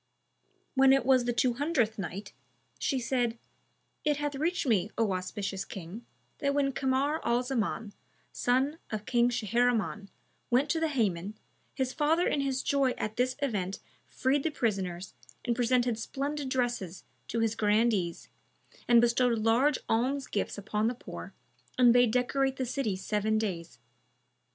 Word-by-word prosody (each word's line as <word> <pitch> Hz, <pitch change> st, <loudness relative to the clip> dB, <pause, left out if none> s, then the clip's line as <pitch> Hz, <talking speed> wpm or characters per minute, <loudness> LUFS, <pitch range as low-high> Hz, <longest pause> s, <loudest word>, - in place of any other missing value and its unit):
When 270 Hz, 0 st, +6 dB
it 270 Hz, -2 st, +2 dB
was 260 Hz, -2 st, +4 dB
the 240 Hz, -, +1 dB
Two 245 Hz, +1 st, +2 dB
Hundredth 245 Hz, -6 st, 0 dB
Night, 195 Hz, +2 st, -6 dB, 0.5 s
She 275 Hz, -, 0 dB
said, 240 Hz, -2 st, 0 dB, 0.7 s
It 295 Hz, -1 st, +2 dB
hath 295 Hz, 0 st, -2 dB
reached 320 Hz, +6 st, -1 dB
me, 210 Hz, -6 st, +2 dB
O 225 Hz, -3 st, +2 dB
auspicious 195 Hz, +1 st, -3 dB
King, 195 Hz, +5 st, -9 dB, 0.3 s
that 280 Hz, 0 st, 0 dB
when 280 Hz, -1 st, +2 dB
Kamar 270 Hz, +4 st, 0 dB
al 240 Hz, +1 st, +1 dB
Zaman, 225 Hz, -4 st, -2 dB, 0.4 s
son 265 Hz, +6 st, +1 dB
of 215 Hz, -1 st, -4 dB
King 240 Hz, -1 st, +3 dB
Shahriman, 225 Hz, -3 st, 0 dB, 0.4 s
went 260 Hz, +4 st, +2 dB
to 330 Hz, -, +1 dB
the 320 Hz, -, +1 dB
Hammam, 210 Hz, -, -1 dB, 0.4 s
his 260 Hz, -1 st, -1 dB
father 320 Hz, +3 st, +2 dB
in 285 Hz, -, +1 dB
his 270 Hz, -1 st, -1 dB
joy 275 Hz, -3 st, +2 dB
at 215 Hz, +1 st, -3 dB
this 255 Hz, +1 st, +1 dB
event 200 Hz, -8 st, -1 dB, 0.3 s
freed 270 Hz, +2 st, +1 dB
the 320 Hz, -, 0 dB
prisoners, 190 Hz, -, -2 dB, 0.3 s
and 235 Hz, -, +1 dB
presented 245 Hz, -1 st, +1 dB
splendid 280 Hz, +3 st, -3 dB
dresses 240 Hz, -8 st, -2 dB, 0.2 s
to 230 Hz, -, -2 dB
his 225 Hz, -1 st, +1 dB
grandees 210 Hz, -5 st, +1 dB, 0.6 s
and 235 Hz, -1 st, +7 dB
bestowed 240 Hz, 0 st, +3 dB
large 235 Hz, +6 st, +3 dB
alm 255 Hz, +5 st, +1 dB
gifts 205 Hz, -, -2 dB
upon 210 Hz, +2 st, -1 dB
the 245 Hz, -, -1 dB
poor -, -, -9 dB, 0.4 s
and 245 Hz, -2 st, +6 dB
bade 245 Hz, -1 st, +5 dB
decorate 265 Hz, +3 st, +1 dB
the 260 Hz, -, -2 dB
city 245 Hz, -5 st, -1 dB
seven 210 Hz, +3 st, 0 dB
days. 180 Hz, -6 st, -3 dB
240 Hz, 150 wpm, -29 LUFS, 215-270 Hz, 0.7 s, and